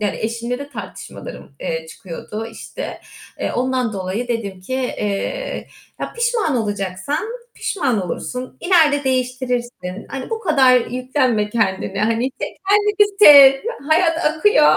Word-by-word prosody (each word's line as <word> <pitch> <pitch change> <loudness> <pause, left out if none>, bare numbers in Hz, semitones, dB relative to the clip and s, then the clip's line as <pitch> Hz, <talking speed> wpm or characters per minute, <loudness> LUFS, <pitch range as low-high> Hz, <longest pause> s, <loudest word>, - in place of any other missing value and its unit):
yani, 205 -2 -1
eşimle 235 +3 -3
de 285 - -7
tartışmalarım, 205 - -9
eee, 160 0 -3
çıkıyordu 205 +6 -7
işte. 230 - -7 0.4
Eee, - - -1
ondan 255 -2 0
dolayı 195 +5 -3
dedim 200 -6 -3
ki 255 +8 -5
"Eee, 260 - -3 0.3
ya, - - -4
pişman 470 - 0
olacaksan 205 - -2 0.3
pişman 245 - -1
olursun, 250 +8 -5
ileride 315 -6 +4
değiştirirsin. 250 -6 -2
Hani 270 -1 -6
bu 450 0 -2
kadar 270 - +5
yüklenme 250 -4 0
kendine. 195 -3 -1
Hani 230 +4 +1
tek - - -4
kendini 415 0 +3
sev. 285 -8 +10 0.4
Hayat 330 +1 +3
akıyor." 305 - +4
250 Hz, 125 wpm, -20 LUFS, 210-295 Hz, 0.4 s, sev